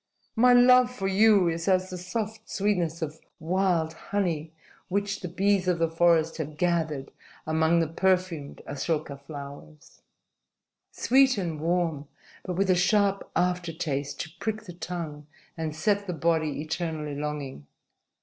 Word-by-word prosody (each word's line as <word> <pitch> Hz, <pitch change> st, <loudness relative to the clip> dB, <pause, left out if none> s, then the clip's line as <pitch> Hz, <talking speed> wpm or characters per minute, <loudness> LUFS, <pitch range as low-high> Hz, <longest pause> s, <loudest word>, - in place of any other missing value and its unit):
"My 250 Hz, +2 st, +5 dB
love 250 Hz, 0 st, +7 dB
for 210 Hz, -6 st, -4 dB
you 200 Hz, -1 st, +5 dB
is 165 Hz, 0 st, -2 dB
as 185 Hz, -1 st, +2 dB
the 180 Hz, -, -4 dB
soft 220 Hz, +4 st, -5 dB
sweetness 175 Hz, -5 st, 0 dB
of 155 Hz, 0 st, -5 dB, 0.2 s
wild 170 Hz, -1 st, +1 dB
honey 165 Hz, -4 st, -2 dB, 0.4 s
which 200 Hz, +1 st, -1 dB
the 180 Hz, -, -5 dB
bees 190 Hz, +2 st, +1 dB
of 180 Hz, -2 st, +2 dB
the 165 Hz, -1 st, 0 dB
forest 165 Hz, -1 st, +3 dB
have 155 Hz, -1 st, -5 dB
gathered 160 Hz, -5 st, 0 dB, 0.3 s
among 160 Hz, +2 st, +2 dB
the 165 Hz, -, 0 dB
perfumed 180 Hz, -3 st, -1 dB
asoka 150 Hz, 0 st, -2 dB
flowers 140 Hz, -, -11 dB, 0.9 s
sweet 265 Hz, -1 st, +3 dB
and 170 Hz, -5 st, -3 dB
warm, 165 Hz, -4 st, 0 dB, 0.3 s
but 180 Hz, -, -4 dB
with 190 Hz, +1 st, +2 dB
a -, -, +4 dB
sharp 195 Hz, +2 st, +2 dB
after 180 Hz, -1 st, 0 dB
taste 140 Hz, -3 st, -3 dB
to 160 Hz, -, -7 dB
prick 220 Hz, 0 st, -3 dB
the 180 Hz, -5 st, -9 dB
tongue 165 Hz, -4 st, -6 dB, 0.3 s
and 160 Hz, -2 st, -4 dB
set 200 Hz, +5 st, 0 dB
the 180 Hz, -, -2 dB
body 160 Hz, -2 st, 0 dB
eternally 160 Hz, -2 st, -3 dB
longing. 145 Hz, -, -5 dB
170 Hz, 145 wpm, -27 LUFS, 155-195 Hz, 0.9 s, love